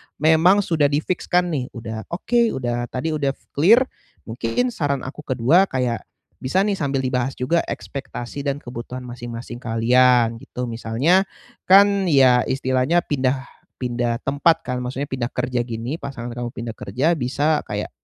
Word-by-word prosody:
memang 160 +6 +4
sudah 155 -5 +2
di 145 +2 0
fiks-kan 180 0 0
nih, 135 -5 -2
udah 110 -2 -6
oke, 235 +7 0
udah 120 -1 -2
tadi 130 +7 -3
udah 140 -3 -1 0.2
klir, 210 - +5 0.4
mungkin 115 - -1
saran 145 - -1
aku 130 +3 -8
ke-2 135 +9 +4
kayak 125 -5 -1 0.4
bisa 160 +9 0
nih, 205 0 +1
sambil 140 -4 -1
dibahas 130 0 -1
juga 165 +7 0
ekspektasi 135 0 -6
dan 140 0 -1
kebutuhan 120 +1 -7
masing-masing 120 -1 -7
kalian, 120 0 +3
gitu. 125 +1 -6
Misalnya 120 +11 +2 0.4
kan 200 +1 +6
ya, 130 -6 +5
istilahnya 130 +5 +1
pindah 135 -3 -1 0.3
pindah 120 -1 -1
tempat 140 +4 +2
kan, 125 -1 -3
maksudnya 135 +3 -3
pindah 125 -2 -3
kerja 125 -1 -1
gini, 120 +5 -4
pasangan 135 -6 -6
kamu 120 -1 -4
pindah 115 -1 -6
kerja, 140 - 0
bisa 145 +4 0
kayak - - -4
130 Hz, 150 wpm, -22 LUFS, 120-155 Hz, 0.4 s, kan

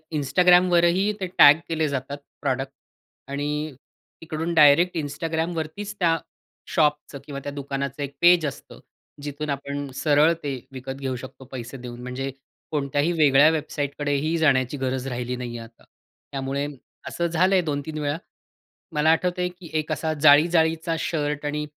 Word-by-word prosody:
Instagramवरही 180 +5 +4
ते 185 - -2
टॅग 145 +3 +8
केले 160 -2 0
जातात 140 +1 -4 0.2
प्रॉडक्ट 135 -1 -1 0.6
आणि 150 +1 -2 0.5
तिकडून 165 +1 -3
डायरेक्ट 165 +3 +5
Instagramवरतीच 160 +6 -3
त्या 165 -2 +3 0.6
शॉपचं 150 -2 +1
किंवा 140 -2 -6
त्या 145 - -4
दुकानाचं 140 0 -4
एक 140 0 -6
पेज 175 -2 +6
असतं. 140 - -7 0.4
जिथून 145 +1 -5
आपण 140 0 -4
सरळ 150 +3 +4
ते 140 -2 -2 0.2
विकत 135 0 -6
घेऊ 130 -1 -2
शकतो 130 +1 -10
पैसे 125 +1 -7
देऊन 120 -1 -9
म्हणजे 130 +2 -4 0.4
कोणत्याही 145 +2 0
वेगळ्या 150 -2 +5
वेबसाईटकडेही 145 0 -1
जाण्याची 140 -3 +2
गरज 130 0 -2
राहिली 125 -1 -3
नाहीये 120 -1 -6
आता. 115 0 -13 0.5
त्यामुळे 135 +1 -2 0.4
असं 170 - -2
झालंय 185 +3 +3
2-3 150 -1 -4
वेळा. 145 +1 -1 0.8
मला 150 +1 +2
आठवतंय 180 +2 0
की 180 -2 -13
एक 155 +1 -4
असा 155 0 -1
जाळी 150 +1 +7
जाळीचा 165 0 +1
शर्ट 150 -2 -2
आणि 150 +1 -2
145 Hz, 140 wpm, -24 LUFS, 140-165 Hz, 0.8 s, टॅग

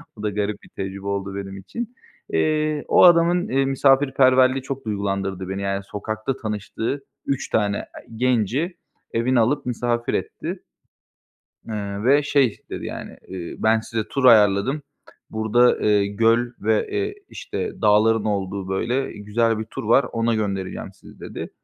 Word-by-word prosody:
O 105 - -10
da 105 - +1
garip 105 0 -3
bir - - -16
tecrübe 95 0 -6
oldu 100 -1 -3
benim 95 -1 -6
için. 235 - -6 0.4
Eee, 155 -1 +1
o - - +5
adamın, 175 0 +5
eee, 135 +1 +2
misafirperverliği 135 -1 +4
çok 135 -2 -5
duygulandırdı 95 -2 -2
beni, 95 +1 -3
yani 100 0 -2
sokakta 110 +6 -4
tanıştığı 110 +4 -4 0.2
3 135 -1 -2
tane 105 -2 +1
ı - - -6 0.3
genci 125 - 0 0.4
evine 120 +2 +2
alıp 135 +5 +1
misafir 120 -1 -1
etti. - - -4 1.0
Iıı, 100 -2 -4
ve 140 +3 +5
şey 140 -6 +2
dedi - - -5
yani, - - -7
eee, 90 -3 -6
ben 110 +1 +3
size 110 0 -3
tur 135 -2 0
ayarladım, 110 +4 +5 0.5
burada, 110 +3 +3
eee, 105 -1 +3
göl 115 +4 +2
ve, 110 +1 +1
eee, 410 0 -2
işte, 435 - -4
dağların 110 +1 +4
olduğu 100 -2 -2
böyle 120 +8 -1
güzel 110 +2 0
bir - - -2
tur 110 - -7
var, 115 +6 +4
ona 115 0 +1
göndereceğim 95 -3 -3
sizi - - -16
dedi. - - -7
110 Hz, 150 wpm, -23 LUFS, 100-135 Hz, 1.0 s, o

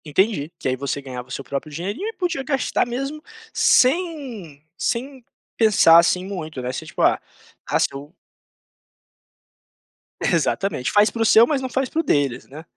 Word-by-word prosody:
Entendi, 160 0 0
que - - -4
aí 130 - +1
você 140 +2 -3
ganhava 125 -2 -8
o - - -15
seu 140 - -5
próprio 140 +3 -5
dinheirinho 200 - -4
e 450 - -4
podia 355 -9 -2
gastar 270 -3 0
mesmo 275 +5 -4 0.3
sem 255 - +1
sem 260 +5 -3 0.3
pensar 195 -7 +6
assim 180 +2 +2
muito, 160 -7 -6
né, 125 0 -3
você, - - -6
tipo: - - -5
"Ah, - - +4 0.6
se - - +3
eu" 140 +2 -9 2.1
Exatamente, 195 -10 0
faz 210 0 +4
para 230 - -5
o - - +3
seu, 225 +2 +6
mas 285 -3 0
não 260 - -4
faz 260 0 -1
para 320 - -2
o - - +1
deles 145 - 0
né. 150 +4 -11
200 Hz, 170 wpm, -22 LUFS, -, 2.1 s, pensar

